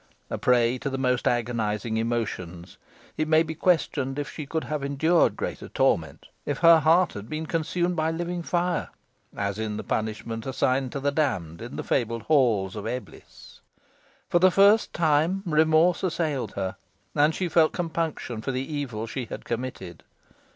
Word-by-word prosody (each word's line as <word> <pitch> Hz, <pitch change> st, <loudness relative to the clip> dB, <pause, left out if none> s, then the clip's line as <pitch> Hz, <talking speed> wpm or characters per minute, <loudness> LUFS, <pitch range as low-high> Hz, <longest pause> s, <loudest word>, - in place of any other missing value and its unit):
A -, -, -1 dB
prey 125 Hz, 0 st, +3 dB
to 140 Hz, -, -3 dB
the 135 Hz, -, -3 dB
most 125 Hz, -2 st, 0 dB
agonising 115 Hz, -2 st, -1 dB
emotions, 100 Hz, -7 st, -3 dB, 0.4 s
it 155 Hz, -, 0 dB
may 155 Hz, +1 st, +5 dB
be 160 Hz, -1 st, -5 dB
questioned 150 Hz, -5 st, 0 dB
if 145 Hz, -, -4 dB
she 150 Hz, -3 st, -7 dB
could 160 Hz, +2 st, -2 dB
have 150 Hz, -2 st, -3 dB
endured 160 Hz, +5 st, +2 dB
greater -, -, -5 dB
torment 80 Hz, -4 st, 0 dB, 0.2 s
if 145 Hz, -, -2 dB
her 165 Hz, -1 st, +7 dB
heart 165 Hz, +4 st, +3 dB
had 105 Hz, +2 st, -8 dB
been 155 Hz, +1 st, -3 dB
consumed 170 Hz, +2 st, -1 dB
by 160 Hz, -1 st, +1 dB
living 175 Hz, +2 st, -3 dB
fire, 175 Hz, +1 st, -1 dB, 0.5 s
as 100 Hz, +1 st, -2 dB
in 110 Hz, -1 st, -3 dB
the -, -, -5 dB
punishment 110 Hz, +1 st, -3 dB
assigned 130 Hz, 0 st, 0 dB
to 140 Hz, -, -3 dB
the 140 Hz, +1 st, 0 dB
damned 90 Hz, -, -1 dB
in 120 Hz, +2 st, -7 dB
the -, -, -4 dB
fabled 115 Hz, -3 st, -1 dB
halls 115 Hz, -11 st, +2 dB
of 105 Hz, 0 st, -5 dB
Eblis. 125 Hz, +2 st, -8 dB, 0.7 s
For 175 Hz, -, +3 dB
the 185 Hz, +2 st, +6 dB
first 200 Hz, +4 st, +5 dB
time 165 Hz, +4 st, +1 dB
remorse 160 Hz, +1 st, +3 dB
assailed 160 Hz, -7 st, -1 dB
her, 95 Hz, -1 st, -3 dB, 0.4 s
and 150 Hz, +2 st, +3 dB
she 185 Hz, -, -1 dB
felt 160 Hz, -2 st, +4 dB
compunction 160 Hz, -9 st, -3 dB
for 135 Hz, -, -2 dB
the 130 Hz, +4 st, -4 dB
evil 125 Hz, -7 st, -3 dB
she 120 Hz, +2 st, -4 dB
had -, -, -8 dB
committed. 115 Hz, -8 st, -5 dB
140 Hz, 170 wpm, -26 LUFS, 115-160 Hz, 0.7 s, her